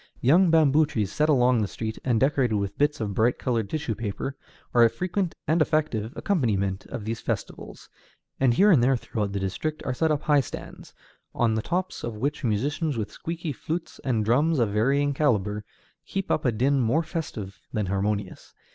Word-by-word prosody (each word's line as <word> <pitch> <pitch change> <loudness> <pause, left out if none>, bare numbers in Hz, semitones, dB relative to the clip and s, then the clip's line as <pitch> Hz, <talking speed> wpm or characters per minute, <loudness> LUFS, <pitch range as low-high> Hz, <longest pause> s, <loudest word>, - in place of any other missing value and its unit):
Young 170 +8 +5
bamboo 155 -2 +4
trees 110 -9 -2
set 150 +1 +1
along 125 -4 +4
the 105 - 0
street, 110 +2 -5
and 120 -4 +2
decorated 135 -4 +2
with 100 -1 -2
bits 150 +1 +1
of 105 -3 -2
bright 115 +4 +2
colored 115 -6 -1
tissue 150 -7 -2
paper, 115 +5 -4 0.4
are 120 - +6
a 115 - +6
frequent 185 - -2
and 160 +2 +3
effective 150 -9 0
accompaniment 100 - 0
of 120 -5 -6
these 115 +1 -3
festivals, - - -5 0.5
and 125 -3 +3
here 205 +7 +6
and 150 -9 +5
there 130 +1 +3
throughout 105 -3 -3
the 100 - -2
district 125 +11 -3
are 130 - -1
set 160 +5 +1
up 150 -1 0
high 145 -2 +4
stands, 125 - -9 0.4
on 115 -2 +2
the 110 - 0
tops 180 +8 -3
of 115 -2 -4
which 145 +6 -2
musicians 135 +6 0
with 105 -2 -3
squeaky 165 +2 -5
flutes, 165 +6 -5
and 115 -5 0
drums 145 +8 +3
of 115 -4 +2
varying 135 +7 +2
calibre, 105 -8 +1 0.5
keep 195 -1 -3
up 155 - 0
a 125 - +4
din 135 +5 +2
more 130 +7 +2
festive 145 - -5
than 105 -2 -1
harmonious. 100 +1 -3
125 Hz, 190 wpm, -26 LUFS, 110-155 Hz, 0.5 s, are